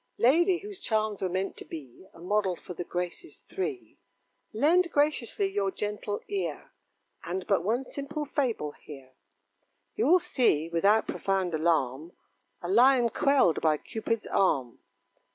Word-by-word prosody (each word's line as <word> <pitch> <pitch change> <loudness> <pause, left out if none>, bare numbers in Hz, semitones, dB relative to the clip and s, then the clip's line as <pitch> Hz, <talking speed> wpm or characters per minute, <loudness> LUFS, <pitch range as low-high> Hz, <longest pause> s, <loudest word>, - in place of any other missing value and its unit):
Lady, 345 +9 +4
whose 405 +1 -8
charms 215 -2 -1
were 190 - 0
meant 190 +2 -2
to - - -8
be 150 +3 -10
A - - -18
model 190 +1 0
for 180 - -10
the 175 - -5
Graces 180 - -5
three; 385 0 -5 0.5
Lend 330 +10 +3
graciously 290 -8 +1
your 195 0 -1
gentle 210 +1 -4
ear, 400 -1 -4 0.5
And 180 +2 -4
but - - +1
one 235 +7 0
simple 290 +3 -5
fable 250 - -1
hear; 135 -3 -13 0.8
You'll 365 -4 +5
see, 245 - +1
without 200 +6 +3
profound 190 -3 -1
alarm, 155 -1 0 0.5
A - - -3
Lion 240 +4 +5
quelled 275 - +3
by 155 -1 +3
Cupid's 225 +5 -3
arm. 135 -11 0
210 Hz, 135 wpm, -28 LUFS, 175-280 Hz, 0.8 s, You'll